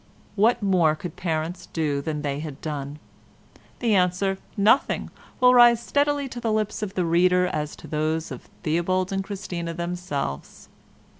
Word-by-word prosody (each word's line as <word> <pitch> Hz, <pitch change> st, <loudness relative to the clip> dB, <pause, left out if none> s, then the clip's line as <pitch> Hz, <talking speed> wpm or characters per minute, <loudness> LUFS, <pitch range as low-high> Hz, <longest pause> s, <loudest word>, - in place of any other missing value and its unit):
What 220 Hz, +2 st, +3 dB
more 175 Hz, -6 st, +3 dB
could 165 Hz, +1 st, -7 dB
parents 165 Hz, 0 st, -3 dB
do 150 Hz, -4 st, -1 dB
than 150 Hz, 0 st, -4 dB
they 140 Hz, -1 st, -2 dB
had 150 Hz, -2 st, -7 dB
done? 145 Hz, -2 st, -5 dB, 0.8 s
The 235 Hz, -3 st, +2 dB
answer 190 Hz, +1 st, +1 dB, 0.2 s
"Nothing" 210 Hz, +7 st, +2 dB, 0.3 s
will 250 Hz, -1 st, +6 dB
rise 240 Hz, -1 st, +6 dB
as -, -, -16 dB
readily 285 Hz, -1 st, +2 dB
to 245 Hz, -, -7 dB
the 230 Hz, -2 st, -1 dB
lips 215 Hz, 0 st, -1 dB
of 200 Hz, -2 st, -4 dB
the 180 Hz, -, +1 dB
reader 180 Hz, +2 st, +3 dB
as 150 Hz, -4 st, -3 dB
to -, -, -12 dB
those 155 Hz, +1 st, -1 dB
of -, -, -9 dB
Theobald 180 Hz, +4 st, 0 dB
and 195 Hz, 0 st, -1 dB
Christina 180 Hz, -4 st, -5 dB
themselves. 170 Hz, -, -4 dB
180 Hz, 160 wpm, -24 LUFS, 155-205 Hz, 0.8 s, will